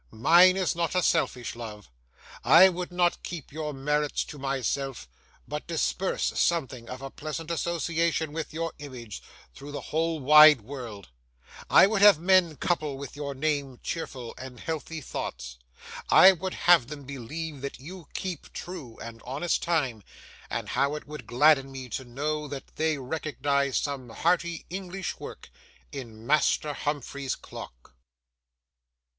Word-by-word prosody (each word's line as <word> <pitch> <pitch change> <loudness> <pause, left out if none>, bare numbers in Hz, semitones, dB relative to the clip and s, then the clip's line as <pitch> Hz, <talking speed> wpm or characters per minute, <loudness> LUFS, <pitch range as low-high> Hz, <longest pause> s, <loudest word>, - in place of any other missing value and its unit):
mine 175 - +6
is 180 -6 0
not 170 +1 -1
a 180 - +2
selfish 125 - 0
love; 110 - -8 0.6
I 190 - +8
would 180 0 -5
not 175 -1 +1
keep 170 -6 -7
your 155 0 -4
merits 150 +1 0
to 145 - -10
myself, 135 - -2 0.4
but 150 0 -5
disperse 170 +3 -1
something 130 -8 0
of 130 +2 -7
pleasant 155 +2 -5
association 165 -2 0
with 160 -2 -4
your 165 +1 -3
image 125 -8 -8 0.3
through 145 +1 -10
the 145 - -7
whole 165 0 +1
wide 150 -1 +8
world; 115 - -8 0.6
I - - +8
would 200 0 0
have 205 -5 +9
men 175 -1 +3
couple 155 -5 -1
with 140 -1 -8
your 140 -1 -5
name 140 -3 -2
cheerful 130 -7 -5
and 130 -2 -9
healthy 160 +2 -4
thoughts; 65 - -6 0.5
I 190 - +9
would 185 +1 -4
have 175 -9 +5
them 145 0 -8
believe 140 +3 -6
that 140 - -5
you 170 +3 -10
keep 185 -3 -5
true 160 -11 -8
and 115 0 -9
honest 145 +7 -1
time; 145 -10 0 0.5
and - - -3
how 140 +2 +1
it 150 - -7
would 150 -5 -9
gladden 135 +1 +4
me 130 -2 -8
to 130 - -4
know 150 +5 -3
that 140 -1 -8
they 160 -1 +1
recognised 140 -1 -1
some 135 -4 -4
hearty 170 +5 0
English 190 0 -5
work - - -10 0.4
in 115 -5 -8
Master 150 +1 +2
Humphrey's 140 -2 -3
clock! - - -11
150 Hz, 145 wpm, -27 LUFS, 130-165 Hz, 0.6 s, have